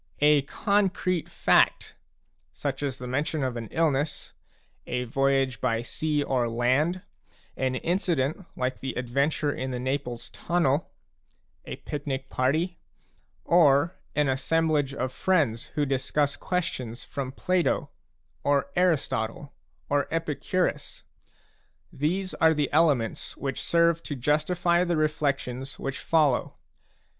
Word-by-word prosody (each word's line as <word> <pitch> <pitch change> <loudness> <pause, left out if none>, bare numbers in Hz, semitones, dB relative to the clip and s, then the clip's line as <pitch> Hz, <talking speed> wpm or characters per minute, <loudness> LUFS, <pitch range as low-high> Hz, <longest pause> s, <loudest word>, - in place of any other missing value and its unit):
A 150 -1 +6
concrete 185 +2 0
fact, - - +3 0.6
such 135 - -3
as 140 -3 -2
the 125 - -7
mention 145 +4 -1
of 130 -2 -1
an 115 -1 -5
illness, 150 -2 0 0.5
a 125 0 -1
voyage 135 0 +1
by 115 -2 0
sea 150 +3 -1
or 125 -4 0
land, 130 +10 +1 0.5
an 130 -1 -1
incident 170 0 0
like 130 0 -1
the 130 -1 -4
adventure 140 +4 0
in 130 -1 -4
the 125 - -3
Naples 125 -2 -3
tunnel, 165 -4 0 0.8
a - - -5
picnic 135 -2 -5
party, 160 +7 0 0.7
or 160 -1 +4 0.2
an 150 -1 +2
assemblage 145 +1 +1
of 130 0 -2
friends 145 -13 +1
who 150 - +2
discuss 140 +2 0
questions 130 -10 -3
from 135 -2 -5
Plato, 180 +5 0 0.5
or 140 -1 +1
Aristotle, 140 -7 0 0.3
or 145 0 +1
Epicurus, 165 +2 -2 0.5
— - - -38
these 185 +5 0
are 160 0 +4
the 145 -1 -1
elements 145 -8 +1
which 135 -2 -3
serve 170 -1 +3
to 145 - -5
justify 170 +6 +2
the 175 -2 0
reflections 140 -4 -1
which 135 -1 -4
follow. 150 -6 +2
145 Hz, 120 wpm, -27 LUFS, 130-165 Hz, 0.8 s, A